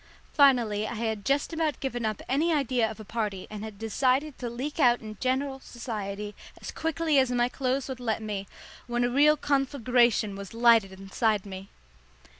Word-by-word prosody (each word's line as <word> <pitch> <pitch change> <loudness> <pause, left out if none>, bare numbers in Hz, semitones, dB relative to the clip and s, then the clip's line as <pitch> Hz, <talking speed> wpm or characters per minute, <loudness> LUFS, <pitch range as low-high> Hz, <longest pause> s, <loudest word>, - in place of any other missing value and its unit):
Finally 235 -8 +4
I - - -5
had 220 -2 -2
just 280 - 0
about 320 -2 -1
given 245 -4 -2
up 215 -2 -4
any 305 +6 +1
idea 255 -6 +1
of 220 - -9
a 215 - -9
party 210 -3 -3
and 210 0 -6
had 215 -2 -8
decided 255 +6 0
to 245 - -3
leak 265 +7 -5
out 245 -4 +5
in 215 -1 -8
general 265 +1 -1
society 210 -5 -6 0.3
as - - -7
quietly 320 -2 +1
as 260 -1 +2
my 245 -1 +2
clothes 260 +1 -1
would 260 -2 -6
let 230 -3 -1
me, 200 -2 -4 0.4
when 240 0 0
a 245 - +1
real 295 +4 +5
conflagration 250 -7 +2
was 200 +2 -9
lighted 230 -4 +5
inside 195 +2 -1
me. 195 0 -8
240 Hz, 180 wpm, -27 LUFS, 215-270 Hz, 0.4 s, out